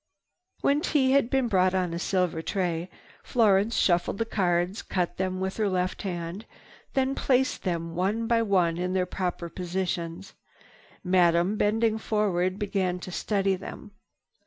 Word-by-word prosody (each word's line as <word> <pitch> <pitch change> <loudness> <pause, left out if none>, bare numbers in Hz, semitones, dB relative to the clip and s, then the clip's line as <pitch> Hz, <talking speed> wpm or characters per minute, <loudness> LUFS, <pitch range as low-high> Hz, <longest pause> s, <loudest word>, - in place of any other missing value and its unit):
When 285 +2 +2
tea 270 -5 +2
had 275 -3 +3
been 265 -2 +1
brought 185 -3 +2
on 180 -2 0
a 170 - -3
silver 180 -3 0
tray, 175 -1 -2 0.3
Florence 215 -1 +3
shuffled 175 +1 +2
the 225 - 0
cards, 180 -2 0
cut 180 -2 -2
them 185 0 -2
with 190 0 -3
her 215 -2 +1
left 185 -1 -1
hand, 175 +1 -5 0.5
then 265 0 +2
placed 265 -1 +1
them 170 -3 -3
one 200 +6 0
by 230 0 +2
one 180 -6 +2
in 180 +1 -2
their 185 -1 +1
proper 180 -1 -3
positions. 180 0 -4 0.7
Then 180 - -5
Madame, 175 +1 +4
bending 220 +1 +1
forward, 190 -4 0
began 195 -3 -1
to 180 0 -8
study 195 +1 0
them. 190 +2 -9
190 Hz, 155 wpm, -27 LUFS, 180-215 Hz, 0.7 s, Madame